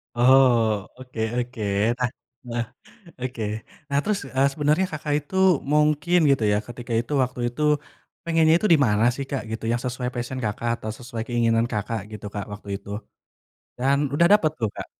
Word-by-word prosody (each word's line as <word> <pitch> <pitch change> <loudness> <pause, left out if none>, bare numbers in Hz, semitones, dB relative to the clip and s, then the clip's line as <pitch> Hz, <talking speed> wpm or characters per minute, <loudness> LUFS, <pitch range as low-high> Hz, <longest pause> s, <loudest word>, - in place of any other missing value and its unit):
Oh, 120 -5 +4
oke 125 -2 -10 0.2
oke. 125 -1 -3 0.4
Nah 125 -1 +1 0.4
nah, 120 0 -1 0.6
oke. 125 -2 -4 0.5
Nah, 140 - +1
terus, 210 -1 0 0.2
eee, 135 +1 +4
sebenernya 150 +5 +2
Kakak 150 -1 -3
itu 150 +6 -11 0.4
mungkin 150 +3 +3
gitu 135 -5 +3
ya, 105 - +3
ketika 120 0 -6
itu 120 +5 -5
waktu 125 0 -5
itu 120 +5 -5 0.6
pengennya 165 -1 +4
itu 215 - 0
di - - +6
mana 105 -1 +2
sih 140 - -4
Kak, 140 - -2
gitu? 110 - -5
Yang 120 0 0
sesuai 125 0 -2
passion 120 +2 -4
Kakak, 105 +3 -2
atau 110 - -7
sesuai 120 -2 -5
keinginan 115 -1 +2
Kakak 110 +1 -2
gitu 105 -1 -8
Kak 100 -1 -4
waktu 105 -1 -10
itu? 100 - -15 0.9
Dan 135 +3 +2 0.2
udah 170 +4 +5
dapet 165 -7 +4
tuh, 110 -3 0
Kak? - - -5
125 Hz, 170 wpm, -24 LUFS, 115-145 Hz, 0.9 s, di